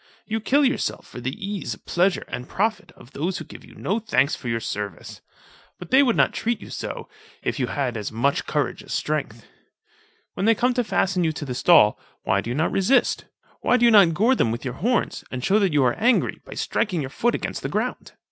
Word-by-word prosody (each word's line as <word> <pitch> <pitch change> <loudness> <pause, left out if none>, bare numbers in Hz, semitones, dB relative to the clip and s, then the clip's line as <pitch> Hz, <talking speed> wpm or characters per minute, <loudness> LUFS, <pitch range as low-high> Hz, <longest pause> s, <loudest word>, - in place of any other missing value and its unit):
You 220 0 -2
kill 275 +6 +3
yourself 260 - -1
for 125 - -10
the 130 - -2
ease, 195 - -4
pleasure, 180 - 0
and 125 +1 -6
profit 215 +3 -1
of 120 - -17
those 175 +6 -2
who - - -7
give - - -12
you - - -16
no 205 +5 -1
thanks 150 - +1
for - - -9
your 115 -1 0
service. 105 -5 -6 0.6
But 180 - -11
they 265 - +7
would 250 -5 +3
not - - +3
treat 235 0 -1
you - - -11
so, - - -5 0.4
if - - -2
you - - 0
had 135 -5 -2
as 105 -2 -4
much 125 +6 0
courage - - -1
as - - -7
strength. - - -3 0.9
When 195 - -1
they 230 - +5
come 250 +4 +2
to 245 0 +1
fasten 185 -4 +1
you 160 - +2
to 150 - -6
the 130 - -4
stall, 125 -4 +5 0.2
why 100 - +1
do 115 - -6
you 120 - -2
not 155 +4 +1
resist? 210 +8 +2 0.3
why 250 - +3
do 240 - +3
you 235 - +6
not 195 -7 +6
gore 225 +9 +4
them 180 - +1
with 120 +3 -5
your 125 - -3
horns, 230 - -1
and 125 -1 -4
shew 200 +3 +4
that 195 -4 +2
you 145 -2 +3
arc 125 -1 +1
angry, 240 +3 +2
by - - -9
striking 185 -7 -1
your 135 -1 -5
foot 240 +9 +1
against - - -4
the - - -3
ground? - - -3
180 Hz, 230 wpm, -23 LUFS, -, 0.9 s, they